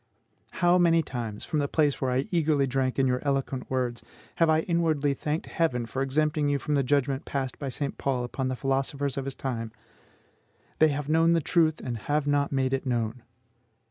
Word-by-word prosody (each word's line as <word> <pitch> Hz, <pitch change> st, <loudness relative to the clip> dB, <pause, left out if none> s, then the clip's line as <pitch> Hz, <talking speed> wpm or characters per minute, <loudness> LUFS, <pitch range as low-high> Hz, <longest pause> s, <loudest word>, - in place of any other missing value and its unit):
How 175 Hz, +1 st, +5 dB
many 165 Hz, -2 st, +4 dB
times, 115 Hz, -7 st, -5 dB
from 155 Hz, -, -1 dB
the 145 Hz, -, 0 dB
place 145 Hz, -1 st, +1 dB
where 130 Hz, -, +1 dB
I 130 Hz, +2 st, 0 dB
eagerly 155 Hz, -5 st, +2 dB
drank 130 Hz, 0 st, -1 dB
in 135 Hz, -, +3 dB
your 125 Hz, -1 st, +1 dB
eloquent 135 Hz, -2 st, -2 dB
words, 125 Hz, -2 st, -1 dB, 0.4 s
have 165 Hz, -1 st, +4 dB
I 155 Hz, 0 st, +4 dB
inwardly 160 Hz, -5 st, +1 dB
thanked 150 Hz, +3 st, -3 dB
Heaven 125 Hz, -8 st, 0 dB
for 130 Hz, +3 st, -4 dB
exempting 150 Hz, +2 st, +1 dB
you 145 Hz, -, +2 dB
from 150 Hz, -, -3 dB
the 140 Hz, -, +3 dB
judgment 135 Hz, 0 st, +1 dB
passed 135 Hz, -2 st, -3 dB
by 140 Hz, -, -3 dB
St. 140 Hz, +2 st, -4 dB
Paul 130 Hz, -3 st, 0 dB
upon 130 Hz, +2 st, -3 dB
the 130 Hz, -, -1 dB
philosophers 135 Hz, +1 st, -1 dB
of 135 Hz, -, -3 dB
his 135 Hz, -, -4 dB
time, 115 Hz, -4 st, -4 dB, 1.1 s
"They 155 Hz, -, +7 dB
have 145 Hz, -1 st, -2 dB
known 165 Hz, +2 st, +4 dB
the 165 Hz, -, +3 dB
truth, 160 Hz, 0 st, +2 dB
and 120 Hz, -3 st, -4 dB
have 145 Hz, +6 st, -1 dB
not 145 Hz, -1 st, +1 dB
made 135 Hz, -1 st, 0 dB
it 135 Hz, 0 st, -1 dB
known"! 120 Hz, -1 st, -1 dB
140 Hz, 200 wpm, -27 LUFS, 130-155 Hz, 1.1 s, They